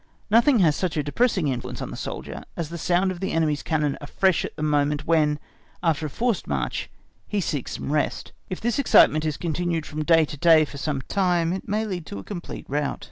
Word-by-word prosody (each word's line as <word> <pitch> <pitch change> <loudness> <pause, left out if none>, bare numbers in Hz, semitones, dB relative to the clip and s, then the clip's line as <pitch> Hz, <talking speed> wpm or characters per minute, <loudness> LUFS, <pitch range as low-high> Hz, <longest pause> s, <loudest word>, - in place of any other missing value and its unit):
Nothing 235 +4 +5
has 155 -4 +4
such 180 -4 -2
a 150 - +1
depressing 185 - +1
influence 125 -2 -4
on - - -5
the - - -6
soldier, - - -6
as 165 -3 -3
the 170 - -6
sound 180 +3 +2
of 180 - -6
the 190 - -2
enemy's 155 -3 +1
cannon 150 -3 -1
afresh 185 +5 +1
at - - -6
the 155 - -5
moment 145 -1 +1
when, 155 -3 +3 0.5
after 160 -2 +1
a - - -7
forced 230 - -1
march - - -2 0.4
he 210 - -1
seeks 145 -8 -2
some - - -4
rest; 150 0 -1 0.2
if 185 - -4
this 235 +3 0
excitement 155 - +5
is 155 -2 -1
continued 170 0 -1
from 155 0 -4
day 165 0 +5
to 145 - -8
day 160 0 +6
for 140 - -9
some 140 -2 -2
time, 175 -2 +1
it 190 - -5
may 215 +2 0
lead 180 -6 -5
to - - -6
a 100 - -7
complete 180 -4 -7
rout. 145 +1 -1
160 Hz, 220 wpm, -24 LUFS, 150-185 Hz, 0.5 s, day